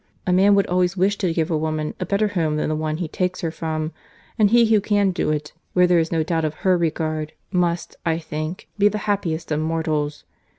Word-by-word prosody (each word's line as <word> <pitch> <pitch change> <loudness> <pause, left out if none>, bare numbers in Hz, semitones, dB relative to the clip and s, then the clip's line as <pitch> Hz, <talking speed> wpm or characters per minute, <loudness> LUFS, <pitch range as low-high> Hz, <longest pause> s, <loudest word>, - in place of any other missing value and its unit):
—A 180 - +2
man 200 +2 +5
would 200 - +3
always 180 +1 +1
wish 195 +3 +2
to 185 -4 +1
give 165 +1 -1
a - - +2
woman 155 -1 -2
a - - -3
better 205 +1 +1
home 165 -6 0
than 155 - -1
the 155 - 0
one 155 0 -2
he 170 -1 -3
takes 180 +3 -2
her 165 - -1
from; 160 -1 -3 0.4
and 215 -3 +4
he 235 +1 +5
who 220 -2 +4
can 205 -1 +2
do 175 - -1
it, 150 0 -2 0.2
where 180 0 +5
there 175 -1 +4
is 160 0 -1
no 165 -2 +1
doubt 165 0 -1
of 155 0 -1
her 185 -1 +5
regard, 155 -2 -1 0.2
must, 175 -2 0
I 165 -2 +1
think, 155 +1 -5
be 205 - +6
the 210 +1 0
happiest 180 -7 -1
of 150 - +1
mortals. 155 -2 -1
170 Hz, 230 wpm, -22 LUFS, 155-190 Hz, 0.4 s, be